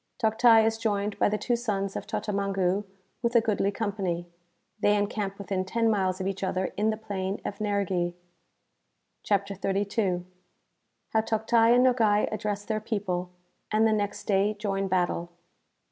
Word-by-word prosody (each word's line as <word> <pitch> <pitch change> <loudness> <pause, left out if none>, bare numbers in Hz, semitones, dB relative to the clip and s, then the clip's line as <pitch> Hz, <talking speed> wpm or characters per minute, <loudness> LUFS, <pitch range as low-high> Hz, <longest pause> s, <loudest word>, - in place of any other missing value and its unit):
Toctai 225 -1 +5
is 225 0 0
joined 205 -2 -1
by - - +4
the 210 - 0
two 240 +3 0
sons 200 -5 -2
of - - -5
Totamangu 195 -1 -1 0.4
with 235 +1 0
a - - +9
goodly 215 -3 +1
company. 195 -5 -2 0.5
They 205 0 +3
encamp 205 -1 -2
within 195 -1 -2
ten 225 +4 +1
miles 190 -3 0
of 185 - -3
each 195 0 -3
other 185 0 -1
in 210 +2 +1
the 215 - -1
Plain 200 -2 -3
of - - -4
Nerghi.) 195 -4 0 1.1
CHAPTER 200 -1 0
XXXII. 195 -1 -1 0.8
How 220 - +2
Toctai 225 +1 +3
and 250 +1 +5
Nogai 220 -5 +3
address 205 -1 -3
their 215 0 -2
People, 190 -5 -2 0.4
and 215 +1 +3
the 220 - +4
next 205 -1 -2
Day 205 +1 +2
join 195 -2 -2
Battle. 175 -2 0
205 Hz, 155 wpm, -27 LUFS, 195-220 Hz, 1.1 s, a